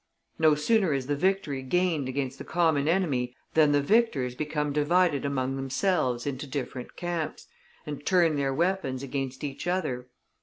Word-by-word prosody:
No 155 Hz, -1 st, +5 dB
sooner 190 Hz, +2 st, +2 dB
is 135 Hz, -2 st, -1 dB
the 145 Hz, +2 st, 0 dB
victory 155 Hz, -4 st, 0 dB
gained 155 Hz, 0 st, 0 dB
against 135 Hz, 0 st, -3 dB
the -, -, -5 dB
common 160 Hz, -4 st, +1 dB
enemy 140 Hz, -9 st, +1 dB, 0.2 s
than 155 Hz, -2 st, +5 dB
the 145 Hz, -1 st, +3 dB
victors 150 Hz, -, +2 dB
become 150 Hz, +1 st, -2 dB
divided 150 Hz, 0 st, +2 dB
among 135 Hz, -1 st, -1 dB
themselves 135 Hz, -2 st, 0 dB
into 140 Hz, 0 st, -4 dB
different 130 Hz, -2 st, -5 dB
camps, 170 Hz, -3 st, -3 dB, 0.4 s
and 145 Hz, -1 st, -6 dB
turn 170 Hz, -3 st, +3 dB
their 140 Hz, -1 st, 0 dB
weapons 160 Hz, -4 st, 0 dB
against 135 Hz, -1 st, -4 dB
each 140 Hz, +3 st, -5 dB
other. 130 Hz, -9 st, -1 dB
145 Hz, 155 wpm, -27 LUFS, 135-170 Hz, 0.4 s, No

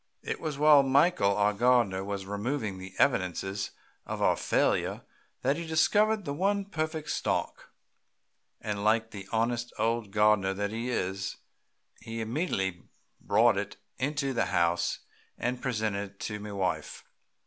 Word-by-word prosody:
It -, -, -3 dB
was 155 Hz, -3 st, -3 dB
while 150 Hz, -1 st, +7 dB
Michael, 135 Hz, -, +3 dB
our 105 Hz, 0 st, +3 dB
gardener, 115 Hz, -4 st, +3 dB
was 100 Hz, -1 st, -4 dB
removing 105 Hz, 0 st, -3 dB
the 95 Hz, 0 st, -9 dB
evidences 95 Hz, +2 st, 0 dB, 0.3 s
of -, -, -5 dB
our -, -, +3 dB
failure -, -, 0 dB, 0.4 s
that 135 Hz, +4 st, +2 dB
he 170 Hz, -1 st, -5 dB
discovered 205 Hz, +6 st, +3 dB
the 140 Hz, -, -2 dB
one 200 Hz, +5 st, 0 dB
perfect 155 Hz, -4 st, -3 dB
stalk, -, -, -2 dB, 0.9 s
and 105 Hz, -1 st, -3 dB
like 110 Hz, +1 st, +2 dB
the 100 Hz, -3 st, -8 dB
honest 120 Hz, +1 st, 0 dB
old 115 Hz, -1 st, 0 dB
gardener 105 Hz, -2 st, +3 dB
that 100 Hz, +1 st, -2 dB
he 115 Hz, +3 st, -3 dB
is, 95 Hz, -4 st, -2 dB, 0.6 s
he 115 Hz, 0 st, -6 dB
immediately 110 Hz, -, -1 dB, 0.4 s
brought 115 Hz, -2 st, +3 dB
it 100 Hz, +1 st, -3 dB, 0.2 s
into 140 Hz, 0 st, -1 dB
the 115 Hz, -, +1 dB
house 85 Hz, -2 st, +1 dB, 0.4 s
and 125 Hz, +1 st, -2 dB
presented 110 Hz, -5 st, -1 dB
it 95 Hz, -, -35 dB
to 105 Hz, 0 st, -4 dB
my 105 Hz, 0 st, -7 dB
wife. 95 Hz, -2 st, -2 dB
110 Hz, 145 wpm, -29 LUFS, 100-140 Hz, 0.9 s, while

